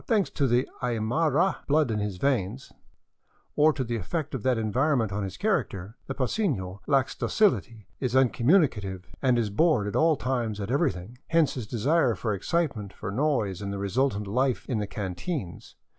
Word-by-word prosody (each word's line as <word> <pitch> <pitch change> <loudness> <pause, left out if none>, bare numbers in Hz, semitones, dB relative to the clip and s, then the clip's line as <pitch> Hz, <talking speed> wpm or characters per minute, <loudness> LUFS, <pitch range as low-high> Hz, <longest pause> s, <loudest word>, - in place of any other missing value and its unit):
Thanks 215 -5 +2
to 140 - +1
the 125 +1 +2
Aymara 135 - +1
blood 150 -3 +3
in 105 - -1
his 105 -3 -3
veins, 125 0 -1 0.8
or 150 +1 +5
to 140 -3 -3
the 120 -1 -2
effect 145 - -3
of 135 - -3
that 130 0 +1
eu' 110 -1 -1
vironment 130 -3 +2
on 105 +2 -2
his 95 - -5
character, 115 - -1
the 135 - -4
paceno 125 - -1
lacks 135 -2 +2
dociHty, 125 - +1
is 130 -2 -1
uncommuni 135 +6 +4
cative, 95 -6 -7 0.2
and 130 -3 +3
is 110 -3 0
bored 140 -2 +3
at 105 - -4
all 160 0 +4
times 120 -6 -2
at 100 +3 -4
everything; 120 - -1
hence 165 -3 +3
his 120 -5 -5
desire 130 +2 +2
for 105 +3 -2
excitement, 110 - -1
for 95 - -6
noise, 110 - 0
and 100 -1 -4
the 100 - -3
resultant 105 +2 0
life 125 +5 0
in 120 -5 -1
the 105 - -2
canteens. 100 - -5
125 Hz, 180 wpm, -27 LUFS, 105-145 Hz, 0.8 s, or